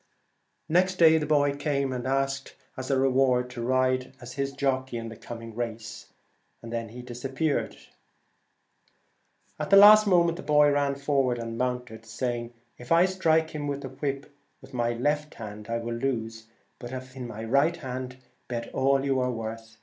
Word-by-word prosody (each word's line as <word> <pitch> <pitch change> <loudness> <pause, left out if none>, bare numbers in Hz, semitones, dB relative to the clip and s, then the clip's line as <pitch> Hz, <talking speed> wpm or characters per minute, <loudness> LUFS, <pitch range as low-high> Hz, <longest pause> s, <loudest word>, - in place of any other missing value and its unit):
Next 185 +3 +2
day 160 -2 +6
the 150 - -3
boy 145 -2 +3
came 140 -2 -1
and 125 0 -4
asked 135 0 -1 0.2
as 130 -2 -6
reward 130 -2 +2
to 120 -1 -6
ride 130 +1 +1
as 125 -1 -9
his 140 0 -2
jockey 130 -3 -1
in 115 0 -5
the 115 - -9
coming 115 0 -9
race, 115 -2 -5 0.6
and 115 0 -7
then 115 -1 -3
was 110 - -14
gone. 125 0 -8
The - - -14
race 120 +1 -8
time 135 0 -6
came 155 +1 +2
round. - - -3 1.8
At - - -3
the 195 - +7
last 210 +1 +9
moment 170 -3 +3
the - - -6
boy 150 -1 +4
ran 140 -1 +1
forward 135 -3 +1
and 115 -1 -5
mounted, 125 -2 -3
saying, 120 0 -3
' - - -43
If 120 - -12
I 170 +2 +6
strike 160 -4 +1
him 150 -1 -4
with 140 0 -3
the 135 - -6
whip 140 +1 -4 0.3
in - - -13
my 120 -1 0
left 150 +5 -1
hand 105 -1 -9
I 115 - 0
will 115 0 -4
lose, 115 -3 -3 0.3
but 120 0 -8
if 130 0 -8
in 125 -2 -6
my 110 -1 -7
right 140 +9 +2
hand 130 -3 -6 0.3
bet 115 -1 -5
all 135 +1 +2
you 135 -1 +1
are 125 0 0
worth.' 115 0 -7
130 Hz, 195 wpm, -27 LUFS, 120-145 Hz, 1.8 s, last